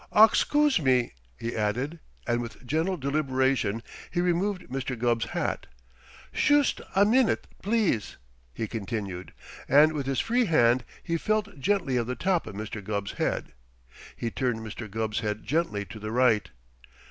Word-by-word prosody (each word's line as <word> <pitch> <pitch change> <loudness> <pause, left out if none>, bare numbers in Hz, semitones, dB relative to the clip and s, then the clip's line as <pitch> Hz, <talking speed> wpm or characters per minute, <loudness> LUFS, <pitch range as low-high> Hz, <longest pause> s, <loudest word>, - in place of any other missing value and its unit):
"Oxcoose 290 +6 +5
me!" 130 -5 +2 0.3
he 115 - -3
added, 125 +10 -1 0.3
and 120 0 +1
with 120 +2 -8
gentle 160 +8 0
deliberation 130 -6 0 0.3
he 175 - -2
removed 180 +2 +1
Mr. 130 -1 -4
Gubb's 115 -1 +1
hat. - - -3 0.7
"Shoost 290 -1 +3
a 200 +1 +6
minute, 245 +3 +3 0.2
please!" 205 - 0 0.3
he 110 - -3
continued, 100 -4 -4 0.4
and 150 +3 +6
with 140 -3 -3
his 135 -2 0
free 240 - +2
hand 120 - +3 0.2
he 170 -1 -1
felt 210 -2 -1
gently 145 -4 +1
of 120 -1 0
the 125 - -2
top 180 -3 0
of 105 - -7
Mr. 110 0 -5
Gubb's 100 0 -3
head. - - -1 0.6
He 115 - -3
turned 125 -3 -1
Mr. 110 0 -7
Gubb's 110 +1 -2
head 105 -1 -3
gently 140 -10 0
to 110 - -10
the 105 +1 -5
right. 120 -3 +3
130 Hz, 150 wpm, -27 LUFS, 110-175 Hz, 0.7 s, a